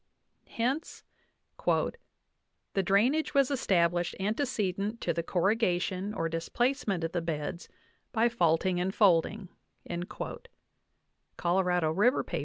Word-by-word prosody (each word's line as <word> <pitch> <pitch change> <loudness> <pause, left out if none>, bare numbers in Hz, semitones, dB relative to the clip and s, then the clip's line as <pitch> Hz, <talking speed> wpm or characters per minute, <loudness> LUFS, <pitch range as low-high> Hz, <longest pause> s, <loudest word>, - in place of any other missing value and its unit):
Hence 255 +7 -2 0.6
"the 195 - -3
drainage 240 - +2
was 275 -1 +4
established 175 -9 +1
antecedent 210 -1 -1
to 170 - 0
the 170 - -1
corrugation 190 +1 0
or 165 - -1
dis 165 0 -4
placement 240 -8 0
of 165 - -2
the 175 -1 -1
beds 165 +1 -4 0.4
by 230 0 +3
faulting 180 -4 +2
and 190 +2 -1
folding" 195 0 +3 0.4
(Colorado 175 - -6 1.4
1 - - -4
River, 240 +6 +4
163). - - -3
190 Hz, 110 wpm, -30 LUFS, 175-230 Hz, 1.4 s, was